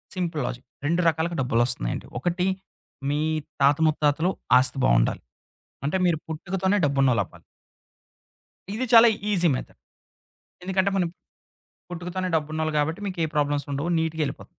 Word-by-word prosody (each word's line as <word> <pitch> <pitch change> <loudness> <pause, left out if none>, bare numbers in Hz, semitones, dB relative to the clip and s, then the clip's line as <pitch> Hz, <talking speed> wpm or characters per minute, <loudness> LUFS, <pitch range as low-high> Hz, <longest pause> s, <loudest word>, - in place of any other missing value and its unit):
Simple 170 -4 -2
logic 125 0 -5 0.2
2 170 +4 +2
రకాలుగా 165 +2 0
డబ్బులొస్తున్నాయండి. 120 - 0
ఒకటి 175 +6 -1 0.6
మీ 145 - 0 0.4
తాత 140 +1 +5
ముత్తాతలు 155 +2 +2 0.3
ఆస్తి 130 +2 +2
బావుండాలి. - - +3 0.6
అంటే 150 - +1
మీరు 170 -3 +2
పుట్టుకతోనే 190 +5 -1
డబ్బున్నోళ్ళవ్వాలి. 125 -11 +1 1.3
ఇది 240 +5 -2
చాలా 230 +1 +9 0.2
ఈజీ 180 -3 +2
మెథడ్. - - -8 0.8
ఎందుకంటే, 190 +1 +1
మనం 180 -3 +1 0.8
పట్టుకుతోనే 180 +2 -4
డబ్బున్నోళ్ళు 155 0 -2
కాబట్టి, 160 +6 -2
మీకు 185 -2 -5
ఏ - - +1
ప్రాబ్లమ్సుండవు 145 +1 -1
నీట్‌గెళ్ళిపో 160 -2 -2
160 Hz, 115 wpm, -25 LUFS, 140-180 Hz, 1.3 s, చాలా